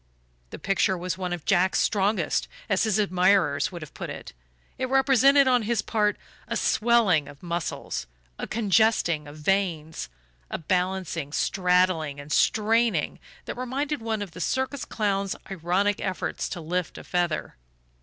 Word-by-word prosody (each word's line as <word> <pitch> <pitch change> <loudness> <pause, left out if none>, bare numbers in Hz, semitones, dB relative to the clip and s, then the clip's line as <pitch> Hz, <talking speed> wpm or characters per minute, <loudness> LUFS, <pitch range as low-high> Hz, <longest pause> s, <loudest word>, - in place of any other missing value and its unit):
The - - -8
picture 195 -1 +1
was 180 +1 -3
one 185 -1 -4
of 175 -3 -4
Jack's 185 0 +3
"strongest," 205 +1 +1 0.2
as - - +2
his 215 -2 +1
admirers 185 -6 +2
would 170 -3 -7
have 150 - -12
put - - -6
it - - -8 0.5
it 255 - -1
represented, 270 +1 +5
on 250 -1 +4
his 225 0 0
part, 210 -2 +1 0.3
a - - -1
swelling 215 -10 +3
of 145 +2 -13
muscles, 170 - -3 0.3
a - - -4
congesting 210 -7 +2
of 145 +1 -11
veins, 160 - -1 0.4
a - - -3
balancing, 180 -3 -1
straddling 180 -5 +1
and 145 +1 -9
straining, 225 +6 +2 0.3
that - - -4
reminded 270 +2 -2
one 220 -2 -2
of 195 - -9
the 180 - -8
circus 260 - -1
clown's 200 -2 -1 0.2
ironic 190 +3 +1
efforts 190 -2 -3
to 175 - -5
lift 175 +2 -3
a - - -9
feather. 175 - -1
190 Hz, 150 wpm, -26 LUFS, 170-220 Hz, 0.5 s, represented